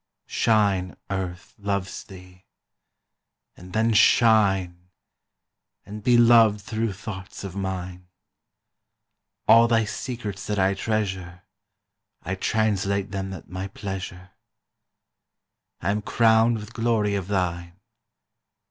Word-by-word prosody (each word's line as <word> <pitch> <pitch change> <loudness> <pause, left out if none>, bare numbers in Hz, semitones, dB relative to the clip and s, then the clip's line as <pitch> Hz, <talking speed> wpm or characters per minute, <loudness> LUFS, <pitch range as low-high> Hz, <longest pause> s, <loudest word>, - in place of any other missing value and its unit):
Shine, 100 -5 +1
Earth 90 -3 -5
loves 100 -2 -3
thee! 90 -1 -14 1.1
And 90 +1 -13
then 110 +2 +1
shine 95 -6 +3 1.0
And 105 +1 -8
be 120 +3 +4
loved 115 -3 +6
through 110 0 -3
thoughts 95 -2 -8
of 95 -2 -7
mine. 90 -2 -5 1.4
All 115 +1 +7
thy 115 -1 +2
secrets 105 -2 -5
that 105 - -2
I 95 0 +3
treasure 95 -4 -3 0.8
I 90 - -3
translate 100 -1 0
them 95 -1 -4
at 95 - -9
my 95 +2 -5
pleasure. 95 -1 -7 1.5
I 95 - 0
am 105 +1 -1
crowned 115 +1 +3
with 105 +2 -9
glory 115 -3 +1
of 100 -3 -2
thine. 85 -2 -2
100 Hz, 105 wpm, -24 LUFS, 95-110 Hz, 1.5 s, All